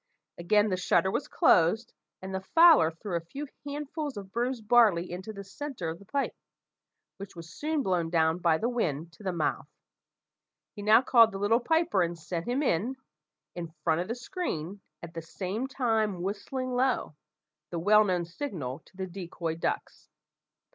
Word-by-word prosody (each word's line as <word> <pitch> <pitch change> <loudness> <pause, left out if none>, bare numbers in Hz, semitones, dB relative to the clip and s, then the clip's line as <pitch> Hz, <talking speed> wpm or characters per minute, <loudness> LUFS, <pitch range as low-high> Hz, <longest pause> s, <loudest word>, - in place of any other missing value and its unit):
Again 210 +5 +3
the 185 - 0
shutter 190 +1 +2
was - - -2
closed, 185 +7 +3 0.3
and 190 0 -6
the 190 - -2
fowler 325 - +6
threw 170 +3 -6
a - - +1
few 275 - -7 0.2
handfuls 290 -2 -4
of 195 -2 -8
bruised 240 -1 -2
barley 210 -8 +4
into 185 +5 -6
the 200 -2 -8
centre 215 - -5
of 160 - -6
the 200 - -15
pipe, 280 -1 -1 0.8
which 200 -1 -9
was 170 -1 -10
soon 305 -1 -1
blown 175 -5 0
down 160 0 +2
by 170 -3 +3
the 225 - -1
wind 170 - -2
to - - -17
the 190 -2 -2
mouth. 170 -3 -1 1.1
He 205 - -8
now 215 +4 +6
called 230 -3 +6
the 195 - -5
little 205 +4 +3
piper, 320 - +2
and 170 0 -1
sent 165 +3 -5
him 255 +5 0
in, 235 - 0 0.6
in 175 -1 -5 0.2
front 165 0 +2
of 180 - -4
the 235 - -3
screen, 225 - -4 0.2
at 170 -1 -8
the 165 - -5
same 190 +9 -4
time 220 -8 0
whistling 255 +7 -3
low 250 - 0 0.6
the 175 - -4
well 210 +5 +5
known 180 -4 0
signal 165 - -5
to 190 - -24
the 190 - -3
decoy 175 -3 -5
ducks. 165 - -4
200 Hz, 175 wpm, -29 LUFS, 170-245 Hz, 1.1 s, fowler